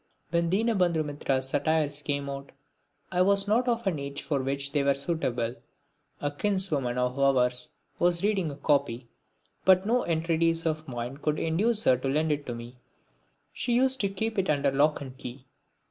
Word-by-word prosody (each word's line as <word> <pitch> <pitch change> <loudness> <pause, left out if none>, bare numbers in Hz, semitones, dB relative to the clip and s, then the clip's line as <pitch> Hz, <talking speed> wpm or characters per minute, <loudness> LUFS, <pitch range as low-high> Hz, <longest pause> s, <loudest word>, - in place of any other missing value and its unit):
When 170 -1 +1
Dinabandhu 185 -6 +1
Mitra's 135 -2 -1
satires 150 0 0
came 140 -1 -2
out 140 0 -7 0.6
I 180 - +1
was 200 +1 +3
not 235 +5 +2
of 235 -1 0
an 175 -6 0
age 140 0 -5
for 140 -3 -1
which 140 +1 -2
they 145 0 +1
were 140 0 +2
suitable. 130 -6 -2 0.6
A 145 - -1
kinswoman 150 -8 +1
of 125 +2 -1
ours 125 -2 +3 0.3
was 175 0 +2
reading 200 -5 +1
a 140 - -6
copy, 135 -5 0 0.5
but 190 0 +5
no 240 +3 +2
entreaties 165 0 0
of 155 -1 -2
mine 120 +1 -5
could 150 +1 -1
induce 210 +8 +1
her 130 - +4
to 130 - -4
lend 155 +3 +1
it 145 -1 -2
to 120 - -3
me. 120 +2 -10 0.8
She 245 - -1
used 260 +2 +3
to 200 - +1
keep 220 +2 -2
it 190 - 0
under 140 -2 +2
lock 145 +3 +2
and 130 -2 -8
key. 130 +1 -9
150 Hz, 175 wpm, -28 LUFS, 135-185 Hz, 0.8 s, but